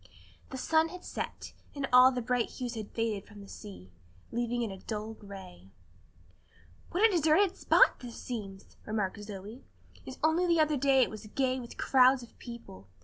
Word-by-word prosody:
The 265 - -6
sun 320 +4 +2
had 365 +1 -10
set, - - -6 0.2
and 280 -1 -2
all 255 +1 +9
the 250 -2 -3
bright 245 0 0
hues 250 -2 -5
had 220 -3 -6
faded 225 -3 -2
from 205 -1 -13
the 200 - -11
sea, 195 - -11 0.4
leaving 240 0 -1
it 220 - -3
a 190 - -12
dull 215 0 -4
gray. 190 - -12 1.2
"What 405 +6 +4
a - - -2
deserted 345 +3 +3
spot - - +4
this 240 -2 -9
seems!" 200 -5 -6 0.2
remarked 210 -1 -2
Zoe, 205 +4 -9 0.4
"and 260 - -7
only 325 +3 +3
the 335 -1 +3
other 305 -1 +3
day 270 -1 +4
it - - -2
was 215 0 -9
gay 260 +3 0
with 240 -2 -10
crowds 260 -1 +4
of 235 - -15
people. 235 - -10
240 Hz, 180 wpm, -30 LUFS, 210-270 Hz, 1.2 s, all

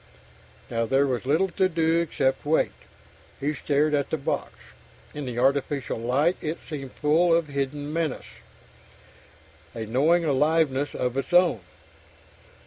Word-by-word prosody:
Now 115 0 0
there 135 +3 +3
was 125 -2 -2
little 165 +7 +2
to 185 +1 +1
do 165 -1 +2
except 135 -5 0
wait. 155 +2 +2 0.7
He 145 +2 -1
stared 150 +1 0
at 140 -1 0
the 160 - -1
box; 140 - -3 0.6
in 145 -1 -5
the 125 -2 -5
artificial 135 0 0
light 140 +9 +1
it 155 +2 -3
seemed 135 -4 -6
full 160 +4 +2
of 165 -3 0
hidden 145 +1 -3
menace, 160 -4 -2 1.5
a 110 -1 -4
knowing 155 +10 +2
aliveness 145 -1 +1
of 125 +1 -2
its 135 - -3
own.... 175 - +5
145 Hz, 135 wpm, -25 LUFS, 135-160 Hz, 1.5 s, own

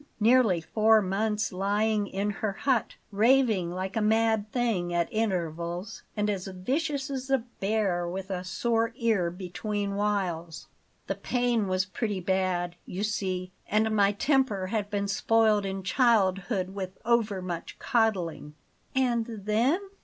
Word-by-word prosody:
nearly 225 -5 +4
four 220 +6 +4
months 210 +1 -1
lying 205 +2 +1
in 200 +2 -1
her 205 0 -2
hut, 255 +2 0 0.2
raving 220 -4 +3
like 185 +3 -4
a 225 - +1
mad 220 0 +2
thing 225 -8 0
at 175 -1 +1
intervals, 175 -3 -2 0.2
and 210 0 +1
as 195 -3 -2
vicious 275 - -2
as 265 -1 -4
a 270 - +4 0.2
bear 195 -4 0
with 190 +2 -5
a 180 -1 -3
sore 230 +5 0
ear 225 -8 +1
between 200 +3 -4
whiles. 185 -6 -2 0.4
The - - -1
pain 245 -4 0
was 185 0 +1
pretty 205 +1 -3
bad, 180 -1 -1
you 190 +3 -4
see, 185 -3 -2 0.2
and 215 +1 +2
my 200 -1 +4
temper 260 -4 +1
had 205 +1 -2
been 200 -1 -1
spoiled 215 0 +2
in 190 0 -4
childhood 195 -4 +2
with 190 -2 -5
overmuch 200 -7 -1
coddling." 195 - 0 0.4
"And 245 -3 +1
then?" 225 - +1
205 Hz, 140 wpm, -28 LUFS, 185-225 Hz, 0.4 s, nearly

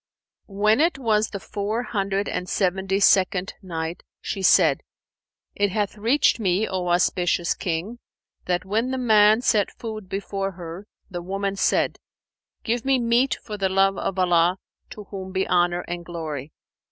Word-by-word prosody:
When 210 +5 +2
it 330 -2 +2
was 220 -4 +1
the 200 - -6
Four 210 +4 -3
Hundred 200 -3 -1
and 180 - -3
Seventy 190 0 0
second 190 -1 +3
Night, 165 -3 -5 0.2
She 195 - -4
said, 190 - +4 0.7
It 205 0 +1
hath 205 +1 -2
reached 235 +6 +2
me, 195 +1 +1
O 185 -1 -3
auspicious 175 0 +1
King, 185 +7 -4 0.5
that 180 0 -1
when 220 +6 0
the 260 - -2
man 215 -2 +5
set 210 -5 +2
food 215 -4 -8
before 195 0 -3
her, 175 +3 -9 0.2
the 175 -1 -4
woman 195 +2 -3
said, - - +1 0.6
"Give 235 0 -1
me 270 0 +3
meat 240 +2 +2
for 210 -2 -6
the 190 -1 +1
love 195 +1 +3
of 195 - -3
Allah 175 0 +3 0.3
to 210 - -9
whom 190 -2 -6
be 190 0 -1
Honour 175 0 +2
and 175 0 -6
Glory!' 160 -4 -6
195 Hz, 155 wpm, -24 LUFS, 180-215 Hz, 0.7 s, man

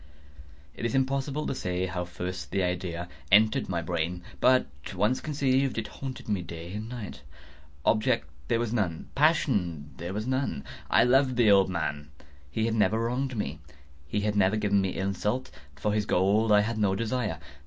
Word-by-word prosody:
It - - -8
is 115 +1 0
impossible 135 +2 0
to - - -1
say 90 -6 -2
how 90 -1 -3
first 90 +1 -5
the 95 - 0
idea 90 -1 -2 0.2
entered 110 0 +5
my 85 -3 -1
brain; 85 +1 -2 0.2
but 130 0 +5 0.3
once 105 +7 +1
conceived, 135 -3 +1
it 115 - -2
haunted 135 -1 -7
me 105 -4 0
day 85 +1 -8
and 110 +2 -5
night. 110 - -7 0.6
Object 105 -9 +2 0.2
there 115 - +2
was 115 -1 -1
none. 90 -8 -1
Passion 100 - +1
there 85 +2 -5
was 110 +1 -2
none. 130 - -1 0.3
I - - +5
loved 130 +1 +4
the 115 -4 +5
old 95 -1 +5
man. 75 -5 -3 0.4
He 110 +9 -1
had 115 - 0
never 110 -1 +3
wronged 125 +2 -1
me. 80 -6 -3 0.5
He 105 +7 -1
had 105 0 0
never 100 0 +3
given 100 -2 +2
me 95 -1 -2
insult. 100 +6 -1 0.2
For 105 +9 -1
his 105 0 0
gold 105 +4 +3
I 105 0 +7
had 110 +1 -2
no 100 -2 +2
desire. 115 -5 -1
105 Hz, 175 wpm, -28 LUFS, 90-120 Hz, 0.6 s, I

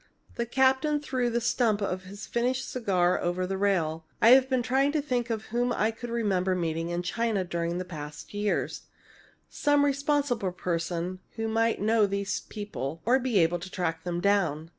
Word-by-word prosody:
The 235 - -3
captain 265 +4 +2
threw 260 -4 -1
the 235 0 0
stump 230 -2 +1
of 185 -2 -3
his 200 +2 -8
finished 250 +2 -1
cigar 185 -7 +1
over 175 +1 -1
the 195 +1 -2
rail. 165 -5 0
"I've 255 +3 +7
been 255 -2 +1
trying 270 +4 +2
to 310 - +2
think 245 -4 -1
whom 235 +2 -1
I 220 -1 +1
could 240 +2 -8
remember 195 -5 +1
meeting 165 -1 -2
in 175 +1 -2
China 220 +1 0
during 170 -1 -2
the 185 - -3
past 150 -2 -8
years 205 0 -1 0.7
some 290 0 +2
responsible 280 -8 0
person 175 +1 -2 0.2
who 225 -1 -2
might 225 0 +1
know 215 0 +3
these 200 0 -2
people 165 - -6
or 250 +4 +4
be 250 -4 0
able 170 +2 +2
to 180 +3 -8
track 165 -3 -2
them 175 -1 -2
down. 170 -6 +1
205 Hz, 175 wpm, -28 LUFS, 175-240 Hz, 0.7 s, I've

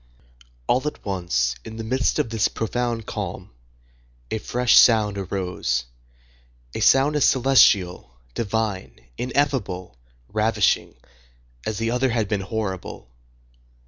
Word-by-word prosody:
All 130 - +1
at 150 - -6
once, 85 - 0
in 110 - -9
the 115 - -5
midst 130 +4 0
of 115 - -1
this 110 -3 +2
profound 115 0 -3
calm, - - -6 0.8
a 110 - -1
fresh 125 +2 +1
sound 110 -3 +5
arose; 90 -10 -2 0.9
a - - -4
sound 140 +3 +4
as 150 - +2
celestial, 100 - +3 0.2
divine, 105 - -3 0.2
ineffable, 125 - -2 0.3
ravishing, 105 -1 +1 0.7
as 110 - -2
the 115 0 -1
other 125 +2 +1
had 115 -3 0
been 100 -1 -1
horrible. 95 - -5
110 Hz, 115 wpm, -23 LUFS, 95-120 Hz, 0.9 s, sound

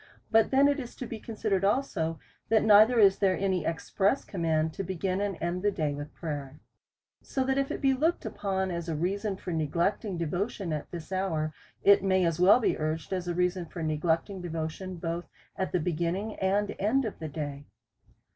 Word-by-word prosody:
But 225 -1 +5
then 275 +1 +5
it 285 +1 +1
is 245 -3 -7
to 250 - -6
be 225 -1 -6
considered 215 -4 -1
also, 195 - 0 0.3
that 220 -1 +4
neither 220 +3 +7
is 200 -3 +6
there 190 -2 +3
an 195 0 0
express 185 - 0
command 160 -3 0
to 195 - -4
begin 190 +1 -2
and 200 -3 -2
end 175 +2 -2
the 205 - +3
day 155 -7 -1
with 145 +1 -7
prayer. 145 -3 -5 0.6
So 265 - -2
that 265 +1 +1
if 275 - 0
tliat - - -5
he 270 -1 +5
looked 315 +4 0
upon 190 -3 -2
as 170 -1 -4
a 160 - -1
reason 195 +5 -1
for 180 - -6
neglecting 170 +5 0
devotion 175 +2 -2
at 150 - -4
this 170 0 -8
hour, 165 -5 -1 0.3
it 200 -1 +6
may 190 -2 +3
as 165 -1 0
well 190 +7 +7
be 235 - 0
urged 155 +3 -2
as 180 -1 -2
a 175 - -1
reason 180 0 0
for 170 0 -6
neglecting 165 +5 0
devotion 165 +2 -4
both 170 0 -4 0.3
at 190 - -2
the 180 - +1
beginning 175 +6 -1
and 200 +2 0
end 235 +7 +2
of 215 - -5
the 160 -1 -5
day. 145 -2 -5
185 Hz, 195 wpm, -29 LUFS, 165-205 Hz, 0.6 s, neither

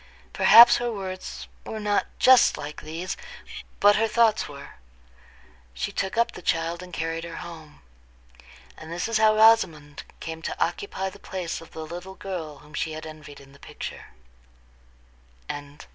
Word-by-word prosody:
Perhaps 235 +2 +8
her 240 0 -2
words 190 -3 -6 0.2
were 220 - -6
not 210 -1 0
just 260 -1 +6
like 150 0 -7
these, 165 +4 -5 0.6
but 205 0 +6
her 225 +1 +2
thoughts 220 -3 +2
were. 140 -1 -11 1.0
She - - -3
took 190 +3 -3
up 235 - +3
the - - -10
child, 165 +1 -1
and 180 0 -10
carried 165 0 -3
her 170 -1 -7
home. 160 - -10 0.9
And 160 +1 -11
this 175 +4 -2
is 225 -1 +1
how 215 0 +5
Rosamond 170 -10 +4 0.2
came 160 0 -6
to - - -5
occupy 190 +2 -2
the - - -14
place 180 -3 -5
of 165 - -13
the 160 - -6
little 175 +4 -8
girl 165 -7 -6
whom 150 - -17
she 160 +1 -2
had 155 +1 -7
envied 155 -2 -11
in 135 -1 -16
the 140 - -18
picture. - - -8 1.4
VII. 145 0 -9
170 Hz, 160 wpm, -25 LUFS, 155-205 Hz, 1.4 s, Perhaps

